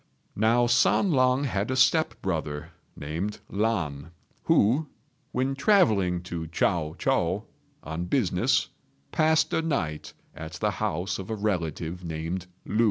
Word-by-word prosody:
Now 115 +3 +3
San 120 +10 +3
lang 130 -1 +3
had 105 -6 -1
a 130 - 0
step 130 +5 +3
brother, 80 -2 -3 0.2
named 85 +8 -4
Lan, 90 -9 -1 0.4
who, 130 +9 +3 0.4
when 130 +2 0
travelling 110 - +3
to 85 -2 -5
Chiao 80 -1 0
chou - - +1 0.4
on 80 +3 -4
business, 90 -5 +1 0.4
passed 160 0 +2
a - - +2
night 90 - -2 0.2
at 80 0 -8
the - - 0
house 90 +3 -1
of 95 - -7
a 110 - -1
relative 90 -4 -2
named 85 +2 -4 0.2
Lu. 105 - -2
95 Hz, 130 wpm, -27 LUFS, 80-125 Hz, 0.4 s, Now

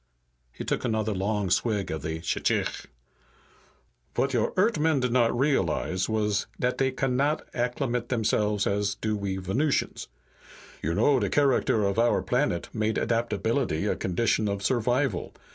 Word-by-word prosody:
He - - -7
took - - -1
another 110 -1 0
long 100 0 -1
swig 105 -1 +1
of 80 - -3
shchikh. 80 +1 -1 1.3
"Vat 135 0 +1
your 120 -3 +1
Eart'men 160 -7 +3
did 125 -2 0
not 120 -1 +2
realize 95 - 0
was 105 -2 0
dat 125 0 0
dey 135 - +3
cannot 135 +3 0
acclimate 125 0 -1
themselves 105 -3 +1
as 100 0 0
do 110 +1 -2
we 100 -2 -3
Venusians. 120 - -1 0.7
You 80 +2 -1
know 130 +6 +4
de 100 -4 0
character 135 -6 +2
of 100 +3 0
our 115 -5 +3
planet 125 -3 0
made 110 -1 0
adaptability 115 - 0
a - - +1
condition 105 +3 0
of 100 -1 -2
survival. 125 -2 0
110 Hz, 140 wpm, -27 LUFS, 100-125 Hz, 1.3 s, know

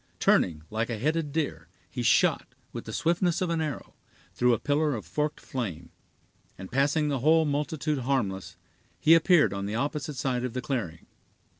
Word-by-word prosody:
Turning 80 -4 +2
like 110 +2 -1
a 115 - -2
headed 155 +5 -1
deer, 155 -1 -2 0.2
he - - -5
shot, - - +2 0.2
with - - -6
the - - -6
swiftness 175 +1 +1
of 180 -2 -1
an 165 -1 0
arrow, 150 -4 -5 0.4
through 125 0 +3
a 115 - +3
pillar 145 +4 +1
of 105 -7 -6
forked 150 - -2
flame, 95 -11 -5 0.7
and 95 0 -9
passing 145 +4 +2
the 140 -3 0
whole 160 +4 +4
multitude 150 0 -1
harmless, 120 -8 -2 0.4
he 160 - +6
appeared 165 - +5
on 100 0 -3
the 105 - -3
opposite 145 +3 -2
side 125 -1 -1
of 125 -2 -3
the 125 - -3
clearing. 105 - -4
140 Hz, 175 wpm, -27 LUFS, 115-155 Hz, 0.7 s, he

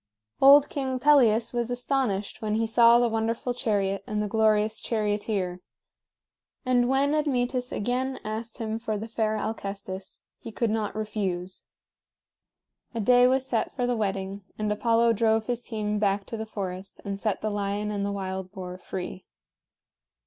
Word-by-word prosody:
Old 280 +1 +8
King 265 -2 -2
Pelias 245 -5 +4
was 240 -1 -1
astonished 245 -5 -1
when 215 -1 -1
he 225 +1 +1
saw 230 +1 +6
the 240 0 +3
wonderful 230 +2 -1
chariot 200 -5 -1
and 210 0 -2
the 210 - 0
glorious 215 0 +2
charioteer; 205 -4 -1 1.0
and 245 -1 +3
when 275 +2 +2
Admetus 255 -4 0
again 255 +4 -1
asked 220 +1 -5
him 225 -2 -3
for 220 -2 -2
the 220 +2 -5
fair 220 -1 -1
Alcestis, 195 -3 -5 0.2
he 230 - -8
could 225 0 0
not 215 -2 -2
refuse. 195 -4 -3 1.3
A - - -1
day 245 +3 +5
was 260 +1 +2
set 235 -4 -1
for 250 - 0
the 245 0 +1
wedding, 195 -2 -3
and 215 -1 -1
Apollo 230 +2 +3
drove 220 0 +2
his 245 0 -2
team 210 -3 -2
back 200 -1 +1
to - - -6
the 220 0 -5
forest 190 -2 -6
and 200 -1 -3
set 215 -1 -1
the 215 - -1
lion 205 +1 -2
and 200 -1 -2
the 200 - -1
wild 190 -1 -4
boar 185 -2 -7
free. 185 0 -6
220 Hz, 160 wpm, -27 LUFS, 200-240 Hz, 1.3 s, Old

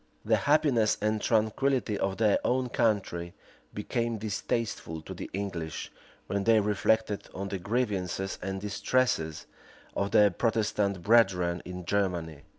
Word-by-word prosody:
The - - +3
happiness 145 -8 +3
and 105 0 0
tranquillity 115 +1 +1
of 95 -1 -1
their 110 -2 +3
own 125 0 +1
country 100 -8 0 0.4
became 115 +2 -2
distasteful 105 -5 -3
to - - -7
the - - -7
English, 90 -5 -4 0.3
when 100 -1 -2
they 115 -1 +5
reflected 105 +1 0
on 100 +1 -4
the 95 - -3
grievances 95 -3 -2
and 95 +1 -3
distresses 100 -5 0 0.5
of 100 - 0
their 105 -1 +5
Protestant 105 -3 0
brethren 90 -6 +3
in 90 -1 -7
Germany. 85 -6 -1
105 Hz, 130 wpm, -29 LUFS, 95-115 Hz, 0.5 s, they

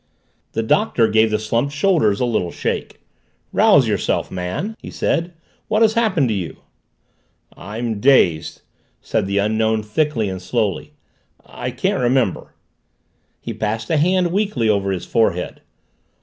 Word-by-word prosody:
The 115 - -1
Doctor 120 - +2
gave 110 +1 +3
the 105 - +1
slumped 115 +6 -1
shoulders 150 - +2
a 125 - +1
little 110 -7 -1
shake. - - -4 0.5
"Rouse - - +5
yourself, - - -1
man!" 95 - -4
he - - -9
said. 170 +2 -1 0.4
"What 215 +1 +2
has 220 -1 +4
happened 195 - +2
to - - +1
you?" 90 -8 -4 1.0
"I'm 110 +3 -4
dazed!" 100 - +3 0.4
said 105 -3 -1
the 100 +1 -1
Unknown 110 +1 +1
thickly 115 0 0
and 95 -1 -5
slowly. 105 +1 -2 0.5
"I - - -6
can't - - -1
remember." 125 -5 0 0.9
He - - -5
passed 110 +7 -3
a 160 - +3
hand 180 +3 +2
weakly 195 - 0
over 100 -2 +1
his 90 -2 -3
forehead. 90 -6 0
110 Hz, 140 wpm, -20 LUFS, 100-150 Hz, 1.0 s, Rouse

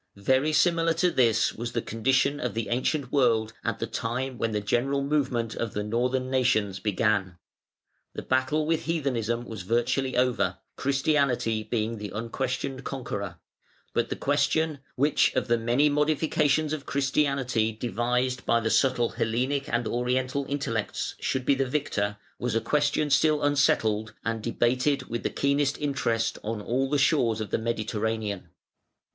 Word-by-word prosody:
Very 130 +9 +2
similar 165 +1 +3
to 175 +2 +2
this 115 -5 +3
was 120 +1 -5
the 115 - 0
condition 130 +5 +1
of 125 - -3
the 115 -1 -2
ancient 130 +2 -1
world 115 -5 +2
at - - -1
the - - -2
time 125 +2 -3
when 115 - 0
the 105 - 0
general 135 +7 0
movement 130 -6 0
of 115 -3 -3
the 105 - -2
Northern 125 +4 -1
nations 110 -7 +1
began. 100 -3 0 0.8
The - - -5
battle 130 +4 +1
with 160 0 0
heathenism 120 -7 -1
was 110 -5 -7
virtually 120 +6 0
over, 125 -1 +1 0.2
Christianity 135 -5 +1
being 110 0 -2
the 105 -1 -5
unquestioned 130 +4 -3
conqueror; 100 -9 -5 0.6
but - - 0
the - - -2
question, 160 -2 +1 0.2
which 145 +3 +2
of - - 0
the 120 -1 +2
many 120 +6 +3
modifications 150 0 +1
of 150 -3 -5
Christianity 135 -5 +1
devised 125 +3 -1
by 115 - +3
the 110 -1 -1
subtle 120 +1 +3
Hellenic 130 +5 -1
and 120 -1 0
Oriental 130 +3 -1
intellects 115 -7 -2
should 130 -1 -1
be 140 - +4
the 135 0 0
victor, 105 -8 -1 0.2
was 120 -2 -1
a - - +4
question 145 +4 +1
still 150 +1 +3
unsettled, 110 -7 +2
and 115 -1 -1
debated 125 +4 +1
with 120 0 -3
the - - -1
keenest 140 0 +1
interest 135 -6 -1
on 110 0 -3
all 130 +5 -1
the 145 - +2
shores 135 -6 +2
of 110 -3 -5
the - - +1
Mediterranean. 110 -4 -2
125 Hz, 155 wpm, -27 LUFS, 115-140 Hz, 0.8 s, be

